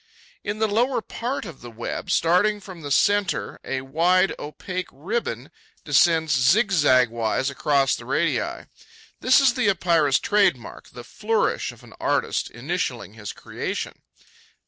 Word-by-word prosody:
In 205 +1 -3
the 220 0 +1
lower 235 +5 +1
part 240 +3 -4
of 165 -7 -10
the 120 - -9
web, 115 +1 -6
starting 195 +5 +2
from 185 -4 -11
the 145 - -6
centre, 195 +2 +1
a 135 -1 -3
wide 170 +8 +2
opaque 180 +5 -5
ribbon 145 - -4 0.3
descends 160 +1 +3
zigzag 145 - +4
wise 120 +4 -1
across 140 0 +1
the - - -10
radii. - - -1 0.5
This 255 - +5
is 270 -3 +4
the 250 -5 +1
Epeira's 170 -7 +2
trade 200 -8 +2
mark, 120 - -12
the 120 - -11
flourish 215 - -1
of - - -17
an - - -15
artist - - -1
initialling 120 - -4
his 105 -2 -7
creation. - - -5
165 Hz, 145 wpm, -23 LUFS, 135-205 Hz, 0.5 s, This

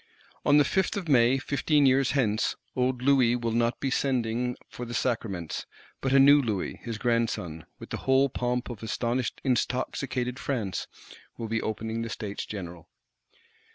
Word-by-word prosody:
On 145 - +5
the 145 - +5
Fifth 190 +7 0
of 185 -4 -4
May, 130 -2 +5
fifteen 145 +2 +2
years 130 0 +3
hence, 110 -6 +1 0.2
old 125 0 0
Louis 130 -3 +4
will 115 -1 -2
not 115 +1 +1
be 135 - -1
sending 125 -2 0
for 125 - -8
the 120 0 -5
Sacraments; 110 -9 -2 0.3
but 135 - 0
a 135 - +5
new 140 +2 +7
Louis, 110 -7 -3
his 115 -2 -4
grandson, 115 -9 -1
with - - -11
the - - -2
whole 135 +1 +5
pomp 125 -1 -2
of 115 - -9
astonished 120 +2 -2
intoxicated 125 0 -1
France, 105 -10 -2 0.5
will 115 - -4
be 115 +1 -1
opening 110 +1 -3
the 115 - -4
States 105 -2 -5
General. 90 -5 -7
125 Hz, 160 wpm, -27 LUFS, 115-135 Hz, 0.5 s, new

